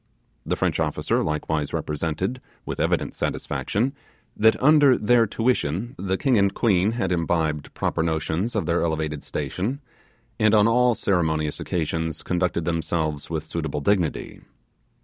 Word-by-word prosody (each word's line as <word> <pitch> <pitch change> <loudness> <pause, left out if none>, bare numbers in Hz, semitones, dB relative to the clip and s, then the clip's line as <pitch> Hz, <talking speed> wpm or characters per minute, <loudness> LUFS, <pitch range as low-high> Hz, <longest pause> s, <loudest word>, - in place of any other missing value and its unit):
The - - +1
French - - 0
officer - - 0
likewise 75 -1 -2
represented, 85 - -2 0.2
with - - -5
evident - - 0
satisfaction, 120 +7 -2 0.4
that 110 +1 +4
under 145 -2 +6
their 115 +2 +3
tuition 115 - -1
the 95 0 -1
king 130 -3 +2
and 100 0 +3
queen 100 -2 +2
had 95 -6 -1
imbibed 80 -3 0
proper - - -1
notions 80 +7 -1
of 105 - 0
their 85 +2 +1
elevated 80 -2 -2
station, 90 - -3 0.6
and 110 0 +4
on 105 0 +5
all 125 +1 +3
ceremonious 80 -6 0
occasions 80 -1 -2
conducted 90 -2 -1
themselves 80 -2 -2
with 80 -2 -2
suitable 80 -2 -3
dignity. 90 -2 -1
90 Hz, 135 wpm, -24 LUFS, 80-110 Hz, 0.6 s, under